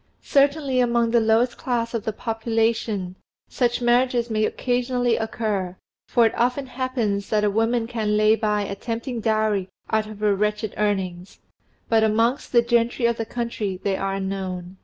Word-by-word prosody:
Certainly 280 -1 +2
among 235 -1 +2
the 235 - +4
lowest 225 +2 +2
class 235 -2 -1
of 230 -3 -3
the 220 - 0
population 225 -4 -1 0.3
such, 245 -1 0
marriages 240 -1 +2
may 215 0 +2
occasionally 245 -1 0
occur, 210 -5 -2 0.3
for 235 -2 +4
it 225 - +2
often 250 +3 0
happens 245 -6 -2
that 210 -1 +1
a 205 - +2
woman 225 +2 +1
can 220 -3 -1
lay 215 +1 +5
by 210 -2 0
a 200 - -4
tempting 235 +3 -4
dowry 215 -3 +1 0.2
out 220 -1 +1
of 215 -1 -10
her 210 -1 +3
wretched 210 +1 -1
earnings, 190 -3 -2 0.5
but 225 -1 +3
amongst 225 +4 +1
the 235 -1 +5
gentry 235 +1 +1
of 235 0 +2
the 225 - -3
country 225 -6 -3
they 195 -1 +1
are 195 0 -2
unknown. 190 -2 -4
225 Hz, 165 wpm, -23 LUFS, 210-240 Hz, 0.5 s, lay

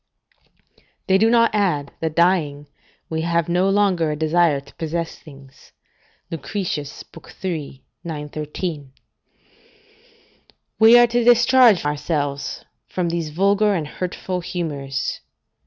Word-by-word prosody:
["They 190 -1 +3
do 220 +2 +4
not 230 -1 +3
add, 175 -9 0
that 160 -1 -3
dying, 160 -5 +1 0.4
we 160 0 -3
have 170 0 0
no 180 +3 +2
longer 195 -5 +2
a 150 - -2
desire 160 -1 +2
to 140 - -17
possess 165 +1 -4
things." 135 -3 -16 0.6
Lucretius, 160 -3 -4 0.4
iii. 155 -7 -4 0.2
913.] 150 -1 -5 1.9
We 225 +2 +8
are 240 - +7
to 240 0 0
discharge 240 - +5
ourselves 145 -1 -3 0.2
from 180 -2 -2
these 165 -2 -2
vulgar 200 +5 +2
and 155 -4 -3
hurtful 180 +2 -4
humours. 145 -7 -4
170 Hz, 110 wpm, -21 LUFS, 150-195 Hz, 1.9 s, We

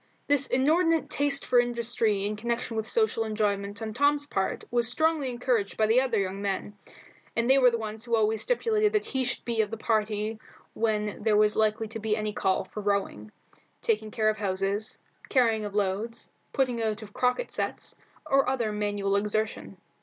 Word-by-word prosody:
This 285 -1 +2
inordinate 320 +5 +2
taste 285 -1 +2
for 245 - +4
industry 235 -4 0
in 210 +1 -1
connection 235 +1 -3
with 220 0 -2
social 440 - +1
enjoyment 205 -1 -2
on 220 -1 -4
Tom's 285 +3 +2
part 195 -9 -2
was 240 -1 +2
strongly 315 0 +1
encouraged 240 -4 -1
by 220 - +3
the 225 +4 +4
other 250 -4 0
young 195 0 -2
men, 200 +1 -3 0.6
and 230 0 +1
they 265 +1 +6
were 250 -2 +6
the 235 - -1
ones 220 0 -6
who 235 -1 +1
always 220 -1 +2
stipulated 435 - +1
that 425 - +1
he 265 -1 -1
should 255 - -2
be 230 -2 +1
of 210 - -2
the 225 - -5
party 215 0 -1 0.3
when 210 -2 -1
there 210 -1 +3
was 210 0 +4
likely 220 0 +1
to 225 0 -6
be 215 0 0
any 215 -1 -2
call 190 -2 +1
for 210 +3 -8
rowing, 200 - -2 0.5
taking 215 -1 0
care 215 0 +1
of 215 -1 -2
horses, 195 +1 -1 0.3
carrying 225 -4 +2
of 205 -1 -6
loads, 210 +4 -2 0.2
putting 250 -4 0
out 220 0 -2
of 205 -1 -12
croquet 250 - +1
sets, - - -4 0.3
or 275 -1 +3
other 240 -5 0
manual 205 -1 -1
exertion. 210 +2 -2
220 Hz, 185 wpm, -27 LUFS, 210-250 Hz, 0.6 s, they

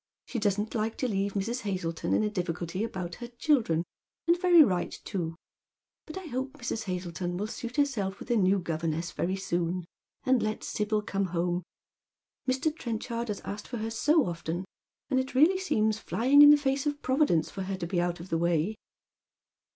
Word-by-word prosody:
She 245 - -3
doesn't 210 +1 0
like 220 0 -1
to 255 - 0
leave 200 -2 -1
Mrs. 230 +5 -1
Hazleton 170 -5 -2
in - - +2
a 210 - +1
difficulty 175 0 -2
about 185 -6 -4
her 240 - -4
children; 235 - +1 0.4
and 340 - +6
very 350 -3 +8
right 185 -8 0
too. 170 -5 -3 0.7
But 310 - -7
I 380 - -6
hope 265 -2 -3
Mrs. 240 -5 -4
Hazleton 175 -1 -3
will 205 - -1
suit 235 +2 -6
herself 230 -10 0
with - - -6
a - - +4
new 195 -2 +4
governess 165 -1 -2
very 185 +2 -1
soon, 175 -2 -1 0.4
and 255 -2 +3
let 215 0 -2
Sibyl 210 0 -1
come 195 -1 -1
home. 175 0 -1 0.9
Mr. 285 +4 +1
Ti'enchard 235 -3 -3
has 210 -2 -3
asked 205 +1 -6
for 245 - -5
her 220 0 -3
so 300 +6 +3
often, 170 +1 -3 0.5
and 260 - +3
it 260 0 -3
really 335 +8 +5
seems 220 - +1
flying 265 +7 +4
in 290 - +11
the 295 - +9
face 275 0 0
of 290 0 -2
Providence 260 - +2
for 195 - -5
her 190 0 -3
to 175 - -3
be 175 +1 0
out 175 0 -1
of 175 +3 -9
the 165 - 0
way." 170 +3 +1
210 Hz, 190 wpm, -29 LUFS, 175-255 Hz, 0.9 s, in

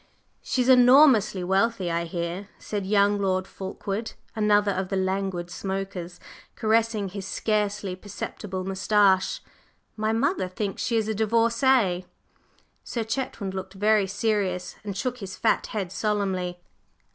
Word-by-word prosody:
"She's 250 -1 0
enormously 250 -6 +6
wealthy, 190 0 +1
I 170 0 -1
hear," 170 +4 -4
said 205 -3 -4
young 205 0 +3
Lord 185 -1 0
Fulkeward, 195 +3 -5 0.2
another 210 -1 +3
of 185 0 -2
the 195 - -1
languid 190 -2 -1
smokers, 190 -2 -5 0.4
caressing 220 -2 +1
his 195 0 -6
scarcely 205 -2 -1
perceptible 190 -1 -6
moustache. 190 0 +2 0.5
"My 215 0 0
mother 235 - +1
thinks 195 +2 -4
she 235 - 0
is 220 -1 0
a 220 - 0
divorcée." 230 -3 +2 0.8
Sir 235 - -3
Chetwynd 225 -4 -3
looked 190 0 -6
very 210 0 +3
serious, 195 -3 -1
and 200 -2 -5
shook 250 +3 -2
his 195 -2 -7
fat 225 - +1
head 195 -5 -4
solemnly. 190 -4 -1
200 Hz, 130 wpm, -26 LUFS, 190-220 Hz, 0.8 s, enormously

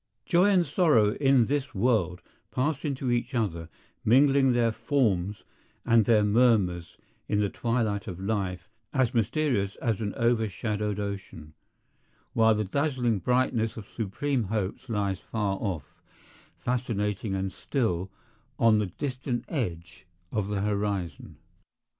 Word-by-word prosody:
Joy 175 +2 +4
and 185 -4 +4
sorrow 150 - +3
in 135 -3 +4
this 140 0 -2
world 95 -5 +1 0.3
pass 145 +2 -1
into 135 -4 -1
each 120 +2 -1
other, 85 -8 -2 0.3
mingling 135 +3 +5
their 120 -1 +2
forms 110 -5 0 0.4
and 115 -3 +4
their 110 -1 +4
murmurs 105 -6 +2 0.3
in 105 - +1
the 100 -2 +1
twilight 115 -4 -1
of 90 -2 -6
life 95 -3 -2 0.3
as 130 -3 +2
mysterious 115 -4 0
as 115 -4 -2
an 100 -2 -3
overshadowed 105 -2 0
ocean, 95 -6 -6 0.8
while 110 -1 +4
the 105 - 0
dazzling 125 -2 0
brightness 120 +1 +1
of 110 - -7
supreme 120 +4 -2
hopes 105 +4 -3
lies 100 -4 -1
far 100 -3 -2
off, 90 -10 -4 0.6
fascinating 105 -5 -2
and 95 0 -2
still, 95 - -1 0.5
on 110 -2 +4
the 105 - 0
distant 130 - -4
edge 90 - -4 0.2
of 105 -3 -1
the 100 -1 -2
horizon. 100 -6 -2
110 Hz, 130 wpm, -27 LUFS, 100-125 Hz, 0.8 s, mingling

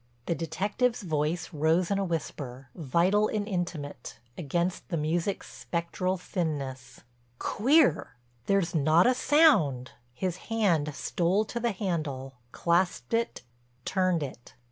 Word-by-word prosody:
The - - 0
detective's 205 +9 -1
voice 160 +1 -1
rose 160 +5 +2
in 200 - +2
a - - +1
whisper, 135 -7 -4
vital 175 +8 +2
and 210 -1 -2
intimate, 175 -7 -4 0.2
against 175 +3 -2
the 170 - -1
music's 165 +5 -2
spectral 185 +2 -2
thinness: 140 -9 -4 0.4
"Queer. 225 - +2 0.3
There's 195 -4 +2
not 155 +2 +4
a 250 - +5
sound." 210 - +4 0.2
His 180 +3 -2
hand 170 -10 +1
stole 185 +5 +1
to 235 - -4
the 235 0 +1
handle, 155 -9 -3 0.2
clasped 170 - 0
it, 230 - -1 0.4
turned 185 -4 +1
it. 130 -3 -9
170 Hz, 120 wpm, -28 LUFS, 150-195 Hz, 0.4 s, a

